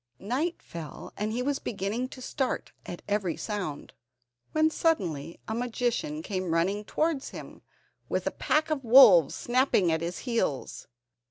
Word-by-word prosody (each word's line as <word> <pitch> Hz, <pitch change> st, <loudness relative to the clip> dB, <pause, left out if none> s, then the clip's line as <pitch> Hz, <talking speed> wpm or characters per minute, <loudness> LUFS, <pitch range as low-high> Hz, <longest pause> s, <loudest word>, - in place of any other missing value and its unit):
Night 275 Hz, -, -2 dB
fell, 160 Hz, -4 st, -8 dB
and 210 Hz, +1 st, -2 dB
he 245 Hz, +3 st, -1 dB
was 280 Hz, +1 st, 0 dB
beginning 215 Hz, +4 st, -2 dB
to 255 Hz, 0 st, -10 dB
start 265 Hz, 0 st, -2 dB, 0.2 s
at 175 Hz, -, -7 dB
every 200 Hz, -4 st, 0 dB
sound, 190 Hz, -9 st, -4 dB, 0.6 s
when 315 Hz, 0 st, +3 dB
suddenly 170 Hz, -, -1 dB
a 220 Hz, -, -2 dB
magician 245 Hz, +6 st, -2 dB
came 185 Hz, -, -3 dB
running 195 Hz, +5 st, +1 dB
towards 305 Hz, +4 st, -1 dB
him, -, -, -10 dB, 0.5 s
with -, -, -1 dB
a -, -, 0 dB
pack 310 Hz, +1 st, 0 dB
of 285 Hz, -3 st, -1 dB
wolves 225 Hz, -, +8 dB
snapping 240 Hz, -8 st, +2 dB
at 160 Hz, 0 st, 0 dB
his 170 Hz, +2 st, -3 dB
heels. 230 Hz, -, -2 dB
225 Hz, 150 wpm, -28 LUFS, 180-270 Hz, 0.6 s, wolves